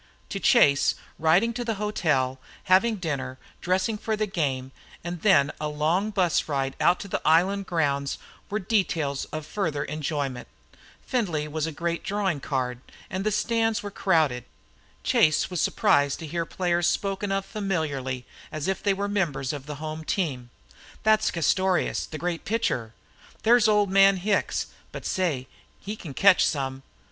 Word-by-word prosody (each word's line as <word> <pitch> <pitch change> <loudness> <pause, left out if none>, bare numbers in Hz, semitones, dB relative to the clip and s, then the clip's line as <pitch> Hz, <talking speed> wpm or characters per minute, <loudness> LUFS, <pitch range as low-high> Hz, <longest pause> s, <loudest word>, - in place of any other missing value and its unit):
To - - -3
Chase, 140 0 +4 0.2
riding 175 +9 +3
to 245 +1 -3
the 225 -2 -2
hotel, 150 -11 0 0.2
having 205 +5 +4
dinner, 140 -8 -4 0.2
dressing 190 +4 0
for 220 0 -1
the 215 0 0
game, 135 -9 -2 0.3
and 175 -1 -5
then 145 -9 +4
a 150 - -1
long 155 +7 0
bus 185 -5 +1
ride 135 -2 -1
out 180 +1 +4
to - - -7
the - - -2
island 185 +5 +3
grounds 140 -4 0 0.3
were 210 - -1
details 175 -9 0
of 155 -1 -6
further 160 -7 -2
enjoyment. 145 -4 -3 0.6
Findlay 175 - -1
was 155 +1 -2
a - - -3
great 170 +2 -3
drawing 195 -6 -1
card 130 -3 -2 0.3
and 190 0 -2
the 215 - +1
stands 225 +1 0
were 205 - -5
crowded. 155 - +1 0.6
Chase 155 +4 +3
was 180 - -1
surprised 145 -1 +2
to 165 - -7
hear 165 +2 -3
players 175 -1 +1
spoken 195 +1 -2
of 195 0 0
familiarly, 155 - -3 0.3
as 155 +1 -4
if 190 - -1
they 200 -1 +2
were 200 +1 -2
members 155 -11 -1
of 145 -1 -7
the 150 - -5
home 155 +2 -6
team. 140 -9 -2 0.5
"That's 215 0 +4
Castorious, 180 +2 +1
the 155 - -6
great 170 0 -3
pitcher." 125 - -1 0.5
"There's 235 0 +5
old 210 -2 +3
man 195 0 +6
Hicks, 200 +2 0 0.3
but - - -8
say! 160 -9 -1 0.3
he 205 +2 -5
can 155 -10 -9
catch 195 +3 +6
some." 135 -2 -1
170 Hz, 160 wpm, -26 LUFS, 145-200 Hz, 0.6 s, man